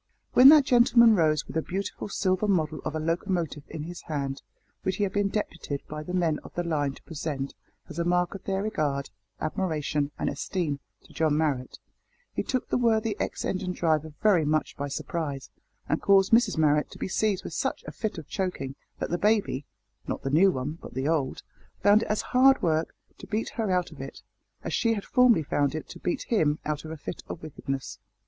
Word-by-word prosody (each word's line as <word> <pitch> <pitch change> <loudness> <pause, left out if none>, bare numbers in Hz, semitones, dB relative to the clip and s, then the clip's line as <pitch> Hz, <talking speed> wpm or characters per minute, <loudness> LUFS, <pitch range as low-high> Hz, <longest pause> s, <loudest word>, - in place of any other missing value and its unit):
When 260 +2 +10
that 300 -2 +8
gentleman 235 -2 +6
rose 155 -4 +2
with - - -10
a - - +2
beautiful 195 +4 -4
silver 190 +1 +1
model 155 -6 +1
of 155 - -3
a - - -1
locomotive 165 -1 -1
in 155 - -6
his 175 +2 -7
hand, 140 -3 -3 0.4
which 185 - -1
he 205 - 0
had 195 -1 -1
been 205 -1 +1
deputed 165 -9 -3
by 150 0 -5
the 180 +4 -4
men 165 -4 +1
of - - -13
the 175 - -1
line 145 -5 0
to - - -17
present 145 -3 -4 0.3
as 165 -1 -7
a - - +2
mark 180 0 +1
of 195 - -8
their 195 0 -1
regard, 145 -10 -1 0.3
admiration, 155 -4 -1
and - - -2
esteem, 160 -7 -2 0.2
to - - -18
John 155 -2 +2
Marrot, 145 -5 -1 0.6
he - - -1
took 255 -2 -2
the - - +1
worthy 225 -2 +2
ex - - -3
engine 185 -1 -2
driver 160 -3 0
very 200 -7 +5
much 155 +1 0
by 145 - -3
surprise, 140 -1 -4 0.4
and - - 0
caused 195 -1 +4
Mrs 230 -4 +4
Marrot 150 -1 +3
to - - -12
be - - -3
seized 195 +1 0
with - - -7
such - - -2
a - - -6
fit 215 -4 -4
of 155 - -8
choking 180 -8 -3 0.2
that - - -4
the 175 - 0
baby 205 - +1 0.4
(not - - -3
the 135 - -2
new 175 +7 +6
one, 150 +3 -4
but - - -10
the 130 +2 -1
old) 150 -5 0 0.4
found 205 +1 +6
it - - -3
as 210 - 0
hard 265 +2 +6
work 160 -1 +1 0.2
to - - -10
beat 215 +2 -1
her 225 -4 -2
out 180 -2 +1
of 150 - -10
it, 135 - -9 0.4
as - - -4
she 230 -1 +2
had 200 - -5
formerly 250 -9 +4
found 145 0 0
it 155 - -5
to - - -9
beat 175 - -2
him 155 -10 +2
out 150 -1 -2
of - - -7
a 160 - -6
fit 155 - -6
of 160 - -7
wickedness. 135 -3 -5
165 Hz, 210 wpm, -27 LUFS, 150-200 Hz, 0.6 s, When